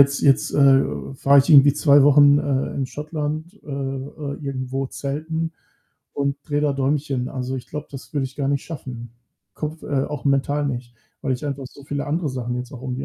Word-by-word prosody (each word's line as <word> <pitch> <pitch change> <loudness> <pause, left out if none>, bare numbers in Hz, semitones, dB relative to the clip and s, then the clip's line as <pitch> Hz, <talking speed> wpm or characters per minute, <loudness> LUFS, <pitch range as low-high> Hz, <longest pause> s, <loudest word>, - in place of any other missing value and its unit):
jetzt 140 0 +4
jetzt, 135 -2 +3
äh, 135 -1 +6 0.3
fahre 140 - +5
ich 135 - -1
irgendwie 140 -2 +8
2 145 -1 +5
Wochen, 145 0 +7
äh, 135 -2 -1
in 135 -2 -1
Schottland, 155 +5 -5
äh, - - -16
äh, 140 +1 -4
irgendwo 135 -1 -3
Zelten 155 +4 -3 0.6
und 140 0 0
drehe 145 -2 -1
da 145 -2 +2
Däumchen. 135 -1 -1
Also, 130 0 -4
ich 125 -2 -7
glaube, 150 +1 -6
das 135 -2 -10
würde 140 -2 +1
ich 130 - -14
gar 140 -2 -1
nicht 140 -1 0
schaffen. 125 -7 -7 0.4
Kopf 155 +1 -5
äh, 135 -2 0
auch 145 -5 -6
mental 140 +1 +1
nicht, 120 -3 -5 0.3
weil 135 - 0
ich 125 +3 -4
einfach 140 -1 -4
so 140 +2 -14
viele 145 0 -3
andere 155 +2 -1
Sachen 125 -1 -3
jetzt 125 0 -6
auch 130 -2 -9
irgendwie. 130 +1 -4
140 Hz, 200 wpm, -22 LUFS, 130-145 Hz, 0.6 s, irgendwie